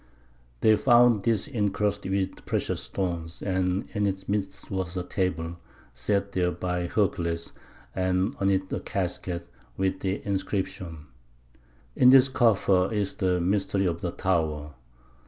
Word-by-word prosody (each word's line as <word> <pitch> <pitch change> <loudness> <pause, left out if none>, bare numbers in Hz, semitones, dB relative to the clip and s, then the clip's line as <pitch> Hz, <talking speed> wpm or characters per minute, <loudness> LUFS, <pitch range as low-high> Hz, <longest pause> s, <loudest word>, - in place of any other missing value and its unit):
They 110 -1 +6
found 120 -3 +5
this 115 -1 +1
encrusted 105 -5 -1
with 95 -1 -2
precious - - -1
stones, 85 -3 -3
and 95 0 0
in 105 0 +1
its 95 0 -4
midst 100 -1 -3
was 95 -2 -2
a 90 - -1
table, 85 -3 -2 0.4
set 100 +11 -1
there 90 -2 +1
by 90 -1 -2
Hercules, 85 -4 -1 0.4
and 95 +4 0
on 95 - +2
it 95 -1 0
a - - -1
casket, 90 -3 -3 0.3
with 95 0 0
the 95 +1 -1
inscription, 95 -5 -3 0.9
"In 125 - +6
this 135 0 +7
coffer 100 -7 +3
is 105 -3 -1
the 90 -1 +1
mystery 95 +2 +1
of 85 -2 -1
the 90 - -1
Tower. 80 -5 -1
95 Hz, 135 wpm, -27 LUFS, 90-100 Hz, 0.9 s, this